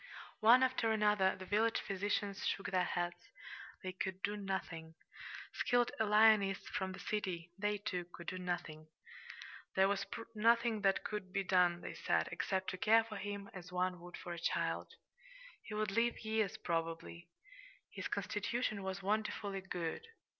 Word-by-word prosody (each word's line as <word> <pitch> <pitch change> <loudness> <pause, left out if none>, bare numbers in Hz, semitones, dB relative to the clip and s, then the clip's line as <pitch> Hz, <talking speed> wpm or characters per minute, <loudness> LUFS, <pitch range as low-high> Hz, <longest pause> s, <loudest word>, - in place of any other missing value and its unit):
One 240 +4 +7
after 255 -3 +2
another 210 -3 +3
the 185 - -8
village 220 +4 +2
physicians 200 0 -2
shook 195 - -1
their 185 -1 +3
heads 175 0 -3 0.5
they 185 - -3
could 190 +1 -4
do 205 - 0
nothing. 185 -5 -4 0.6
Skilled 245 -1 +2
alienists 210 -2 +5
from 190 0 -2
the - - -9
city 180 -5 -3
they, 205 +1 0
too, 180 -3 -3
could 170 - -10
do 185 +2 -4
nothing. 175 -4 -4 0.9
There 190 0 +5
was 200 0 0 0.3
nothing 230 0 +3
that 195 -1 +3
could 210 -3 -4
be 195 +1 0
done, 180 -2 +3
they - - -6
said, - - +1
except 190 -1 -1
to 185 - -6
care 225 +3 +6
for 220 -2 -7
him 200 0 -5
as 180 -1 -9
one 180 0 0
would 175 +1 -9
for 175 - -6
a 170 - -6
child. 170 - -1 0.7
He 215 - -7
would 215 -1 0
live 230 +3 +1
years, 220 -1 0
probably. 165 -1 -3 0.6
His - - -4
constitution 210 +2 -1
was 190 0 -4
wonderfully 205 -1 -1
good. 180 - -4
195 Hz, 155 wpm, -36 LUFS, 180-215 Hz, 0.9 s, One